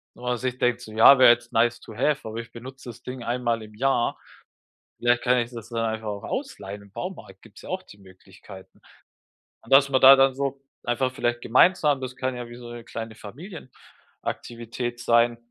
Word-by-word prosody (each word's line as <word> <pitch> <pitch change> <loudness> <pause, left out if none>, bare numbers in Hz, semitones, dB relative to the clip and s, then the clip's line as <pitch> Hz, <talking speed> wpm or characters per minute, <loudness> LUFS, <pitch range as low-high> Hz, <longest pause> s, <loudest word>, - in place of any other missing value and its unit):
wo - - -16
man 125 0 -1
sich 125 +1 -3
denkt 125 0 +1
so: 110 - -10
„Ja, 115 +5 +8
wäre 130 - +9
jetzt 120 0 -1
nice 120 +1 +2
to 110 - -12
have, 145 +3 0
aber 110 +1 -6
ich 115 - -9
benutze 130 +2 -10
das 115 - -11
Ding 125 -1 -7
einmal 120 -1 -1
im 105 0 -13
Jahr. 130 0 +1 0.8
Vielleicht 120 0 +2
kann 125 0 +3
ich 120 0 -3
das 115 -2 -9
dann 115 -1 -2
einfach 110 0 -3
auch 100 -1 -5
ausleihen.” 100 +1 -5
Im 100 - -19
Baumarkt 100 - -8
gibt 115 -1 -18
es - - -15
ja - - -10
auch 185 +1 -3
die 100 - -16
Möglichkeiten. 95 0 -15 0.8
Und 115 - -2
dass 140 0 +6
man 130 -1 +2
da 135 +1 +10
dann 135 0 +4
so 140 0 -3 0.2
einfach 130 +2 0
vielleicht 120 -1 -1
gemeinsam 145 +2 +3
das 130 -1 -6
kann 130 0 -3
ja 120 -1 -6
wie 120 - -10
so 120 -1 -10
'ne 120 -1 -9
kleine 115 -1 -7
Familienaktivität 120 - -8
sein, 120 0 +3
120 Hz, 205 wpm, -25 LUFS, 115-130 Hz, 0.8 s, da